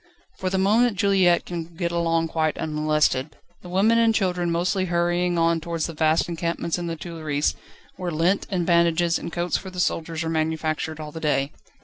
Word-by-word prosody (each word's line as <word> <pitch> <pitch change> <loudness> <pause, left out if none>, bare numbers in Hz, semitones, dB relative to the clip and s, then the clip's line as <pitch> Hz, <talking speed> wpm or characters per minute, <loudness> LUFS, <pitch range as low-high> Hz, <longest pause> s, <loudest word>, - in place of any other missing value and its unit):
For 185 - -1
the 190 - 0
moment 210 +3 +3
Juliette 185 -3 +3
can 170 -1 -6
get 170 0 -2
along 165 -1 +1
quite 155 -1 0
unmolested: 150 -2 0 0.3
the 180 - -11
women 210 +6 +3
and 225 -1 +3
children 180 -4 0
mostly 180 +3 0
hurrying 175 0 +1
on 165 0 +2
towards 165 -1 -2
the 165 - -5
vast 155 +1 +2
encampments 170 0 -2
in 175 - -4
the 165 - -3
Tuileries, 155 -3 -2 0.4
where 180 -1 -3
lint, 170 +4 +1
and 180 -4 -1
bandages, 170 0 +3
and - - -6
coats 175 +1 -1
for 190 - -8
the 185 -1 -8
soldiers 165 -1 -1
are 160 - -2
manufactured 160 0 -1
all 150 -1 -6
the 160 - -7
day. 145 -2 0
170 Hz, 190 wpm, -24 LUFS, 160-180 Hz, 0.4 s, moment